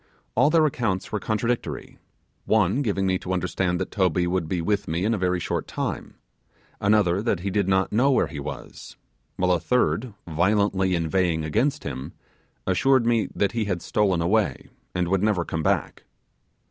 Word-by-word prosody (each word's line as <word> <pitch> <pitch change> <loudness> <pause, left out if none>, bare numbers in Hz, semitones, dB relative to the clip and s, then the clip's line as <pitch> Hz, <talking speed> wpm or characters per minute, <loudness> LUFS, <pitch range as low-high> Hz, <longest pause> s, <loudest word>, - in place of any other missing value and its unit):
All 145 - +4
their 160 0 +4
accounts 115 -10 -1
were 105 - -1
contradictory: 115 +4 -2 0.5
one 110 +4 +2
giving 100 -6 0
me 95 -1 +1
to 95 - -4
understand 90 0 -1
that 95 - -3
Toby 90 -3 +1
would 85 -2 -1
be 90 - -1
with 100 +4 -1
me 85 +4 -1
in 115 - +2
a - - 0
very 90 -1 +1
short - - -3
time; - - -4 0.6
another 100 -3 +3
that 105 -6 0
he 100 +1 -2
did 100 0 +1
not 95 0 +2
know 125 +6 +3
where 135 - +3
he 75 - -7
was; 75 +2 -8 0.4
while 90 0 +1
a 90 - +3
third, 125 +2 0
violently 95 +2 +2
inveighing, 85 0 0
against 135 - 0
him, 65 -1 -6 0.5
assured 135 -3 +3
me 115 -2 +2
that 100 - +1
he 115 -2 -1
had 90 -4 -2
stolen 95 -5 +1
away, 100 -6 0 0.3
and 90 -1 0
would 95 +1 +1
never 100 -5 +1
come 80 - -3
back. - - -1
95 Hz, 175 wpm, -24 LUFS, 90-110 Hz, 0.6 s, All